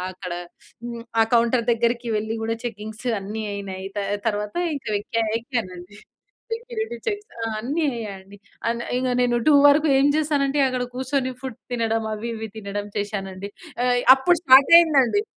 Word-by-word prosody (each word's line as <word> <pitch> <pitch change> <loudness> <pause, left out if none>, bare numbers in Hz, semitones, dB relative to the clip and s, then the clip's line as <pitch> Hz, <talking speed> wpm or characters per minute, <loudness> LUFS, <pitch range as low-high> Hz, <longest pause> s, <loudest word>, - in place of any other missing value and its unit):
అక్కడ 185 -1 -7 0.5
హ్మ్, 235 -1 -6 0.2
ఆ - - +7
కౌంటర్ 235 0 +3
దగ్గరికి 235 +1 0
వెళ్లి 220 +1 -2
కూడా 225 0 -1
చెకింగ్స్ 220 0 -6
అన్నీ 210 +3 -5
అయినాయి. 195 -1 -6
త - - 0 0.3
తర్వాత 210 -1 -1 0.2
ఇంకా 260 -6 -5
ఎక్క 215 - -7 0.2
ఎక్కానండి. 205 -6 -5 0.6
సెక్యూరిటీ 465 0 -4
చెక్స్ 415 0 -4
అ! - - -1
అన్ని 290 +8 -1
అయ్యండి. 200 -3 -8 0.3
అన్ 235 0 -3 0.2
ఇంక 255 0 -1
నేను 240 -1 +2
2 295 - +6
వరకు 300 +2 +4
ఏం 280 - +4
చేశానంటే 290 -2 +1
అక్కడ 255 -1 -2
కూర్చొని 260 0 -1
ఫుడ్ 260 -4 -6
తినడం 225 -2 0
అవి 230 +2 -5
ఇవి 220 0 -5
తినడం 205 0 -5
చేసానండి. 200 -1 -5 0.3
ఆ! 250 - +2 0.3
అప్పుడు 340 +6 +2
స్టార్ట్ 265 +3 +7
అయింది 320 -5 +4
అండి. 410 - 0
235 Hz, 155 wpm, -23 LUFS, 210-270 Hz, 0.6 s, ఆ